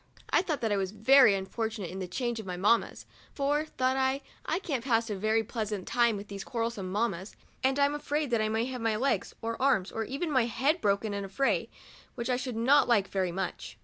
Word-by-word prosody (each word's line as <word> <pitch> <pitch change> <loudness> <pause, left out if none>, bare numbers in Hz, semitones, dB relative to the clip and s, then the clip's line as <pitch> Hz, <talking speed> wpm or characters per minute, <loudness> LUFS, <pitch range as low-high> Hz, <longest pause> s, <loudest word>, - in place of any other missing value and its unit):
I - - +5
thought 320 -6 -3
that 225 -2 0
I 205 - +2
was 190 -1 -1
very 220 +2 +6
un 190 -1 -3
fortunate 215 -3 -4
in 190 - -6
the 185 - -4
change 240 +5 -2
of 220 - -7
my 180 -1 -4
mammas, 210 +5 +1 0.3
for, 290 +2 +1
thought 260 -3 0
I, 265 +1 +1 0.3
I 320 - +1
can't 285 -10 -3
pass 230 -3 +1
a - - -1
very 215 +3 +1
pleasant 210 -3 -4
time 235 -3 +2
with 200 +1 -8
these 200 -1 -6
quarrelsome 230 -6 -3
mammas, 200 -2 -2 0.3
and 265 +1 +2
I'm 285 0 +3
afraid 295 -1 -2
that 230 -2 +2
I 215 - +1
may 220 +2 0
have 255 -1 -5
my 225 -1 +1
legs 265 +6 0
or 230 +1 -3
arms, 210 -9 +2
or 225 - -2
even 285 +7 -3
my 255 -4 +3
head 270 +9 0
broken 205 +1 +1
in 200 0 -3
a 195 - -7
fray, 270 +8 0 0.5
which 240 0 -2
I - - +3
should 250 -1 -4
not 255 +6 +4
like 205 -5 +3
very 190 -2 -1
much. 190 +1 -5
230 Hz, 235 wpm, -29 LUFS, 200-265 Hz, 0.5 s, very